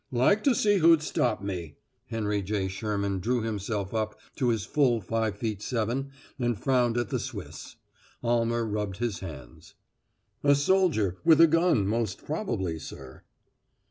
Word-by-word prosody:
"Like 130 - +3
to 270 -4 +4
see 205 -2 +3
who'd 165 -2 +5
stop 125 -8 0
me!" 85 -6 -5 0.3
Henry 105 -3 -1
J. 100 0 -1
Sherman 100 0 -2
drew 120 +4 0
himself 105 -2 -3
up 110 -1 -2 0.2
to 125 -3 +1
his 110 -3 0
full 125 -3 +2
five 110 +1 -1
feet 105 -1 -3
seven 125 +4 -2 0.3
and 120 -3 0
frowned 125 -2 +1
at 120 -4 -1
the - - -1
Swiss. - - -7 0.5
Almer 115 0 +1
rubbed 105 -3 -3
his 115 -4 -2
hands. 65 -10 -10 0.7
"A 145 0 +5
soldier 145 - +2
with 165 -2 +6
a 165 - +10
gun, 165 - +3
most 110 -1 -2
probably, 110 - -2
sir." 65 -4 -10
115 Hz, 150 wpm, -27 LUFS, 100-130 Hz, 0.7 s, a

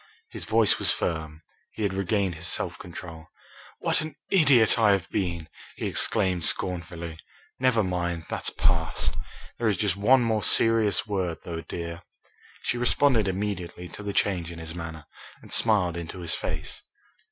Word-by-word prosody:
His - - -6
voice 110 -1 +4
was - - +3
firm. 80 -1 -1 0.3
He 110 - -4
had 100 -2 0
regained 95 -1 0
his 85 +1 -4
self - - -1
control. 85 -2 -9 0.5
"What - - +1
an 155 -2 -6 0.2
idiot 135 - +5
I 105 -3 +5
have 95 -4 -1
been!" 85 -5 -2 0.3
he - - -4
exclaimed 90 -3 +1
scornfully. 85 -2 -3 0.4
"Never 125 -4 +3
mind, 85 -2 -2
that's - - -1
past. - - +1 0.5
There 115 - +1
is 105 -4 +2
just 100 -1 +1
one 125 +7 +5
more 110 -2 +1
serious 110 -2 +3
word, 95 -6 -2
though, 85 -1 -4
dear." 85 +1 -6 0.6
She 120 - -1
responded 120 -3 +3
immediately 95 -3 -3
to 105 - -8
the 100 -1 -3
change 90 -4 0
in 85 - -9
his 80 0 -7
manner, 80 -3 -7 0.4
and - - -8
smiled 100 -7 +3
into 85 +2 -6
his 85 -2 0
face. - - -4
90 Hz, 160 wpm, -26 LUFS, 85-110 Hz, 0.6 s, idiot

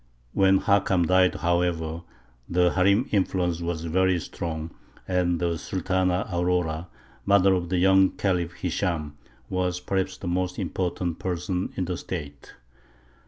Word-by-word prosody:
When 95 0 +4
Hakam 100 -4 +2
died, 95 +1 +4
however, 85 -2 0 0.5
the 90 0 +3
harīm 100 +6 +3
influence 90 -4 +1
was 85 -1 -3
very 90 +2 +2
strong, 80 0 -5 0.4
and 90 -2 +1
the 85 -2 -1
Sultana 95 0 0
Aurora, 85 -2 0 0.4
mother 100 -1 +4
of 90 -2 -1
the 90 - 0
young 95 +1 +5
Khalif 90 -3 0
Hishām, 85 -4 -1 0.4
was 90 +1 -1
perhaps 95 +1 -2
the 95 - -7
most 90 +1 -1
important 90 -2 -2
person 90 0 -2
in 95 - 0
the 90 0 -3
State. 75 -6 -7
90 Hz, 130 wpm, -25 LUFS, 85-95 Hz, 0.5 s, young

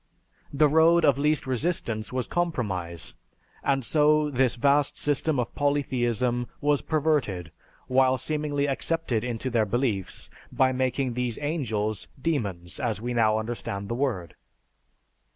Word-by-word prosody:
The 150 +2 +4
road 160 +2 +5
of 140 -2 +3
least 150 0 +1
resistance 125 -5 -1
was 130 -1 -1
compromise, 95 - -2 0.5
and 135 -3 +1
so 150 +1 +3
this 130 -2 +2
vast 140 +3 +2
system 145 0 0
of 120 - -2
polytheism 125 -4 0
was 145 -1 +2
perverted, 140 - 0 0.3
while 130 0 +3
seemingly 145 +1 -1
accepted 140 -4 -1
into 125 +1 -3
their 110 -3 +2
beliefs, 110 -4 -2 0.2
by 130 0 +3
making 130 0 -1
these 125 -1 -1
"angels," 110 - -2
"demons," 100 - -2
as 115 -6 -1
we 120 +2 -3
now 110 -2 +3
understand 110 -3 -4
the - - -1
word. 115 - -2
130 Hz, 130 wpm, -26 LUFS, 115-145 Hz, 0.5 s, road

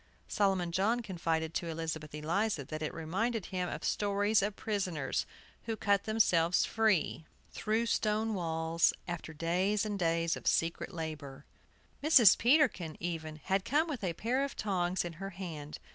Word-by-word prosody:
Solomon 190 -4 +1
John 210 +7 +1
confided 165 -5 -2
to 170 - -2
Elizabeth 160 -2 -4
Eliza 165 +3 0
that 155 +3 -6
it 155 - -2
reminded 195 +7 -2
him 180 -2 -3
of - - -6
stories 205 +1 +2
of 200 0 -1
prisoners 180 -10 -2 0.4
who 225 - -2
cut 200 -2 +1
themselves 180 -6 +3
free, 210 -8 +1 0.3
through 220 +2 0
stone 220 -1 0
walls, 165 -2 +1
after 175 -2 -5
days 180 +7 0
and 205 -2 -3
days 165 -1 +1
of - - -8
secret 165 0 +1
labor. 150 -5 -6 0.6
Mrs. 265 - +8
Peterkin, 240 - +2
even, 160 -3 -4
had 190 0 +1
come 300 +9 +2
with 270 -9 -5
a 175 -3 0
pair 245 +10 0
of 280 - -4
tongs 185 -3 -1
in 170 - -5
her 195 - -3
hand. 165 -6 -7
185 Hz, 155 wpm, -32 LUFS, 165-215 Hz, 0.6 s, Mrs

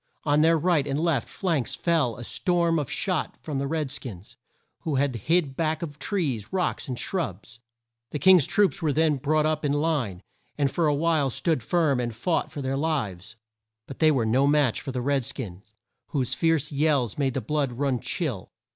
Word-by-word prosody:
On 150 0 +3
their 165 +1 +5
right 160 -3 +2
and 140 +1 -1
left 160 -7 +1
flanks 165 - -1
fell 160 -9 +1
a 120 - -7
storm 170 - +1
of 145 - -3
shot 185 -5 -1
from 145 -4 -4
the 140 - -1
red 155 -2 -2
skins 105 -9 -8 0.4
who 155 -3 -2
had 135 -1 +1
hid 160 -5 +2
back 160 0 -1
of 145 -3 -7
trees, 140 - -2
rocks, 185 -3 -1
and 125 -2 -4
shrubs. 120 - -4 0.5
The - - -3
King's 180 -2 +6
troops 200 -3 +2
were 155 -3 +1
then 155 0 +2
brought 150 +3 +1
up 155 0 0
in 145 -1 +1
line, 145 - -1 0.3
and 140 -2 +1
for 165 +2 +1
a 145 - +2
while 155 -2 +2
stood 155 +2 0
firm 145 +2 +1
and 120 -2 -3
fought 155 +5 -1
for 145 -3 -5
their 135 +1 -1
lives. 110 - -2 0.5
But 135 - -10
they 155 - +5
were 130 -7 +2
no 130 +5 +3
match 145 -5 +2
for 135 - -5
the 125 -1 -3
red 140 +1 +1
skins, 100 -5 -7 0.4
whose 130 -4 -1
fierce 160 -3 +1
yells 145 -5 +1
made 135 -3 0
the - - +1
blood 150 -2 -1
run 135 0 0
chill. 130 - -3
145 Hz, 195 wpm, -26 LUFS, 130-160 Hz, 0.5 s, King's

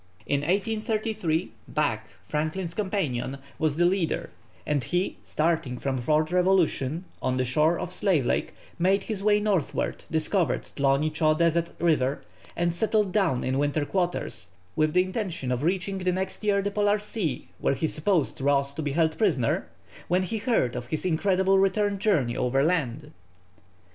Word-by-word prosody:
In 140 -1 0
1833 205 -1 -1 0.2
Back, 115 -8 -1 0.2
Franklin's 160 +3 -2
companion, 160 - -2 0.2
was 155 -2 +1
the 175 +2 +3
leader, 180 -2 0 0.3
and 145 -3 0
he 180 +8 -1
starting 155 -6 -1
from 130 0 -2
Fort 155 +6 +1
Revolution, 180 -4 +2 0.2
on 130 0 0
the 130 - +1
shore 155 +7 +2
of 180 - -5
Slave 180 -11 +2
Lake, - - -1 0.2
made 190 +3 +3
his 215 -3 -3
way 210 0 +4
northwards, 205 -7 -1
discovered 160 -2 +1
Thloni 140 +2 +1
Tcho 155 0 +2
Deseth 170 0 +1
River, 145 -5 +1 0.3
and 170 0 0
settled 210 +1 +1
down 180 -11 +1
in 130 +1 0
winter 145 +1 +1
quarters, 175 - -2 0.3
with 155 0 +2
the 180 - +6
intention 185 - -3
of 125 0 -1
reaching 190 +4 -1
the 185 0 +1
next 190 +3 -3
year 200 -1 +2
the 205 - -1
Polar 205 0 +2
Sea, 205 - -3
where - - +1
he 135 - -1
supposed 155 -3 0
Ross 140 0 +2
to 155 - -4
be 145 -2 -2
held 160 0 +1
prisoner, 150 - +1 0.4
when 180 +2 +2
he 220 +4 -3
heard 205 - +1
of 120 -1 -5
his 155 +7 -3
incredible 190 +2 +2
return 200 +1 +1
journey 160 - +1
overland. 140 +1 0
165 Hz, 160 wpm, -26 LUFS, 145-195 Hz, 0.4 s, the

